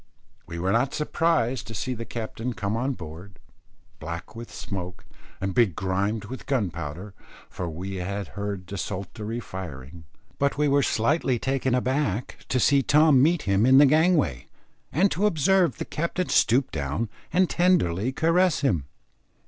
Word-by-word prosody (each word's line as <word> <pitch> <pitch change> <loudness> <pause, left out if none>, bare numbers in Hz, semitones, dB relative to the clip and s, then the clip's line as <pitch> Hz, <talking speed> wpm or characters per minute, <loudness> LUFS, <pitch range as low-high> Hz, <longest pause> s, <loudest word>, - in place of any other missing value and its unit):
We 85 - -6
were 90 +3 0
not 120 +5 +1
surprised 150 -5 0
to 115 - -7
see 130 +5 -2
the 115 -1 -6
captain 115 +2 -5
come 100 +2 -2
on 130 +4 -1
board, 90 +1 -10 0.6
black 85 +6 -7
with 115 0 -8
smoke 90 -2 -6 0.3
and 95 0 -2
begrimed 100 0 0
with 130 +5 -8
gunpowder, 90 - -3 0.4
for 90 -2 -4
we 95 +4 -5
had 100 +2 -4
heard 100 -2 -5
desultory 100 +4 -5
firing, 80 - -8 0.3
but 140 0 +1
we 150 0 +2
were 140 0 +3
slightly 130 +2 +1
taken 130 0 0
aback 125 -4 -2
to 125 - +1
see 140 +3 +4
Tom 150 -1 +5
meet 165 +3 +3
him 100 +1 +2
in 130 +2 +6
the 145 - +8
gangway, 155 - +2 0.4
and 190 +7 +3
to 195 +7 +2
observe 180 +1 +2
the - - -4
captain 170 +3 -2
stoop 130 +4 +3
down 75 +10 -2 0.2
and 185 +1 +3
tenderly 130 - +2
caress 165 +3 +2
him. 90 - +1
115 Hz, 150 wpm, -25 LUFS, 95-140 Hz, 0.6 s, the